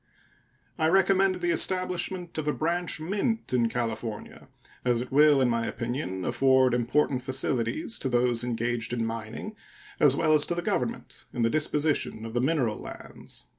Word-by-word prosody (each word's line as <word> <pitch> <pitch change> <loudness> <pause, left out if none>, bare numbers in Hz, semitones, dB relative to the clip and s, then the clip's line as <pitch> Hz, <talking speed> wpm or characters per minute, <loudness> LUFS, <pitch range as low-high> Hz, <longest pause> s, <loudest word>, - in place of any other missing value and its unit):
I 160 - +3
recommend 190 0 +3
the 175 -1 +1
establishment 185 -1 0
of 150 - -4
a 150 - +1
branch 170 +1 -1
mint 205 - -2
in 120 -2 +2
California, 115 -2 -5 0.4
as 120 -2 +1
it 125 - -6
will, 145 0 +5
in 130 - +3
my 115 -1 0
opinion, 120 -6 -4
afford 130 +1 +3
important 125 +2 +1
facilities 130 - -1
to 135 - -1
those 120 -1 +2
engaged 120 0 -2
in 115 -2 -1
mining, 115 - -6 0.4
as 140 -3 +5
well 155 - +2
as 150 -1 +6
to 175 - -1
the 175 - -3
Government - - -3
in 120 - -1
the 115 - +2
disposition 150 -6 0
of 115 - -7
the 120 - 0
mineral 130 -6 0
lands. - - -9
130 Hz, 165 wpm, -27 LUFS, 120-165 Hz, 0.4 s, as